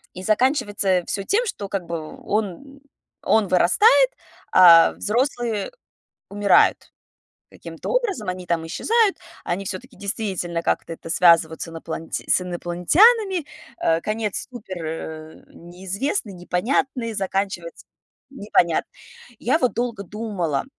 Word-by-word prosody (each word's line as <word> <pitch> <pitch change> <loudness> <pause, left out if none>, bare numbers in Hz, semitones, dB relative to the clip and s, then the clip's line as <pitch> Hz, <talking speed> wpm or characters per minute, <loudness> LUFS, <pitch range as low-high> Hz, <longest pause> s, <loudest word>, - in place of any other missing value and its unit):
И 185 - -7
заканчивается 215 -2 +1 0.2
всё 200 - -3
тем, 455 - +1
что, 205 - -5
как 195 -2 -3
бы, 170 0 -4 0.3
он 220 +7 -3 0.4
он 220 -2 +2
вырастает, 440 - +5 0.4
а 170 -3 +8
взрослые 235 -2 -1 0.6
умирают 205 0 +4 0.7
каким-то - - -9
образом. 410 - -1
Они 185 0 -4
там 170 -2 -1
исчезают, 440 - +1 0.3
они 190 +3 -3
всё-таки 215 +7 -7
действительно 190 -5 -3
как-то - - -1
это 165 - -11
связывают 165 -1 +4
с - - -5
иноплан 165 0 -7
с - - +1
инопланетянами. 330 - +3 0.4
Э, 165 0 +2
конец 215 -1 -3
супер, 210 -6 -8
э, 160 0 -7
неизвестный, 190 - -4
непонятный, 230 +4 -1
заканчивается 195 - -3 0.4
непонятно. 205 -9 0 0.5
Я 260 +6 +1
вот 250 - +1
долго 235 -3 -3
думала 195 -8 -3
200 Hz, 115 wpm, -22 LUFS, 175-250 Hz, 0.7 s, а